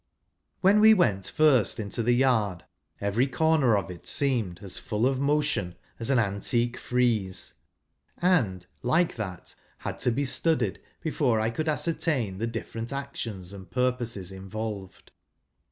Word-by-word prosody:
When 195 +3 +5
we 220 +1 +8
first 130 - +3
went - - -8
into 105 +2 -2
the 120 +2 +3
yard, 110 -9 +1 0.3
every 105 +6 +1
corner 135 -3 +3
of 90 -3 -3
it 90 - -11
seemed 120 -11 0
as 95 - -1
full 110 -1 -1
of 130 0 +1
motion 145 - 0 0.2
as 115 - -4
an 135 - +4
antique 115 +3 0
frieze, 115 -7 0 0.6
and, 120 - +1 0.2
like 160 +8 +2
that, 95 -6 -6 0.2
had - - -5
to - - +2
be 140 +4 0
studied 160 +4 0 0.2
before 140 -8 +1
I 110 +1 0
could 155 +7 -2
ascertain 150 - 0
the 115 - -1
different 115 +1 -5
actions 115 -9 -5
and 95 -2 -10
purposes 120 -7 -1
involved. 95 0 -7
120 Hz, 140 wpm, -27 LUFS, 100-140 Hz, 0.6 s, we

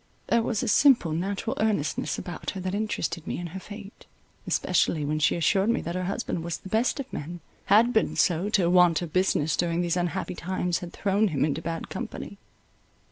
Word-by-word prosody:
There 235 - +4
was 225 -1 -1
a - - -2
simple, 240 - +5
natural 195 +9 -2
earnestness 200 -8 0
about 175 - -5
her 195 - -5
that 185 +1 -3
interested 175 -6 -2
me - - -2
in 175 - -5
her 190 - -5
fate, 205 +1 -11 0.4
especially 150 -3 +1
when 155 +1 -1
she 150 - +3
assured 190 +5 +2
me 235 - +2
that 170 - -4
her 185 0 -2
husband 175 -3 -3
was 170 0 -3
the 190 - -11
best 225 +7 +1
of 270 -1 -6
men,—had 195 +8 0
been 220 - +1
so, 180 +3 +2
till 180 -5 +2
want 180 -2 +5
of 160 -3 -7
business 185 -5 +2
during 170 0 0
these 175 0 0
unhappy 175 +1 -2
times 180 0 -2
had 175 -1 -8
thrown 205 +1 +1
him 145 -6 +1
into 155 +1 -2
bad 165 0 -4
company. - - -6
180 Hz, 195 wpm, -26 LUFS, 170-205 Hz, 0.4 s, simple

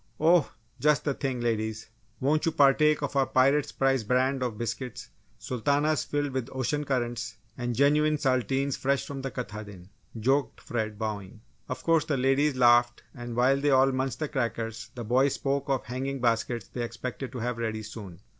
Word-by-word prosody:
"Oh, 165 0 +4 0.3
just 150 0 +3
the 145 - 0
thing! 130 -3 -3
Ladies, 110 -2 -2 0.3
won't 150 +5 +1
you - - +3
partake 150 +1 +4
of 145 - -3
our 135 -1 +3
Pirate's 135 +3 +3
Prize 135 -3 +1
brand 130 +4 +1
of 120 -4 -2
biscuits? 120 +2 -5 0.3
Sultanas 145 +5 0
filled 145 -1 -1
with 130 -1 -3
ocean 140 +3 -1
currents 120 -4 -2 0.2
and 120 -1 -3
genuine 150 +3 +3
Saltines 135 0 0
fresh 140 0 0
from 140 -1 -6
the 135 - -3
Katahdin!" 105 -6 -7 0.3
joked 135 +5 +1
Fred, 110 -3 -3
bowing. 105 0 -5 0.3
Of - - -5
course 165 -2 +3
the 145 - 0
ladies 135 +2 +2
laughed 120 -1 +4
and 120 -2 -7
while 130 +3 +4
they 145 - +2
all 135 0 +5
munched 130 -1 -2
the 155 - -2
crackers 115 -5 -3
the 120 - -5
boys 130 +5 +2
spoke 140 0 -2
of 135 -2 +1
the 110 - -18
hanging 135 +2 -3
baskets 115 -2 0
they 125 - -5
expected 120 +3 -5
to - - -5
have 120 0 -3
ready 110 -1 -2
soon. 100 -5 -9
130 Hz, 180 wpm, -28 LUFS, 115-140 Hz, 0.3 s, all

